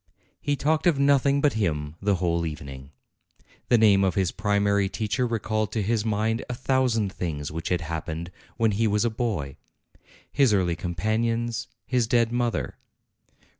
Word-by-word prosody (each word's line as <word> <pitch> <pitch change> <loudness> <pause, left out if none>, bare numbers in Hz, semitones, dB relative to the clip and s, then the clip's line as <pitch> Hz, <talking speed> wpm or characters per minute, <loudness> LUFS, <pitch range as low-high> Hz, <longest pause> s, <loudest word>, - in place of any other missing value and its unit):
He 145 0 0
talked 155 +5 +1
of 165 -5 +3
nothing 140 0 +3
but 150 -2 +3
him 75 -8 -2
the 100 0 +2
whole 85 -1 0
evening. 70 -4 -7 0.8
The 120 - +6
name 105 -3 +5
of 95 - +1
his 95 -4 +1
primary 100 -1 +1
teacher 110 +5 -1
recalled 110 -2 -1
to 110 - 0
his 110 +1 0
mind 110 +1 0
a 125 - -2
thousand 120 -6 +1
things 75 -4 -4
which 80 +2 -4
had 90 -1 0
happened 80 +1 -5 0.3
when 115 -2 +2
he 110 +3 +1
was 105 +2 +1
a 120 - +1
boy, 105 - -3 0.7
his 130 -7 +3
early 90 -3 +1
companions, 110 +7 -1 0.2
his 125 -3 +1
dead 115 -1 +2
mother. 120 -1 -1
105 Hz, 160 wpm, -25 LUFS, 90-120 Hz, 0.8 s, The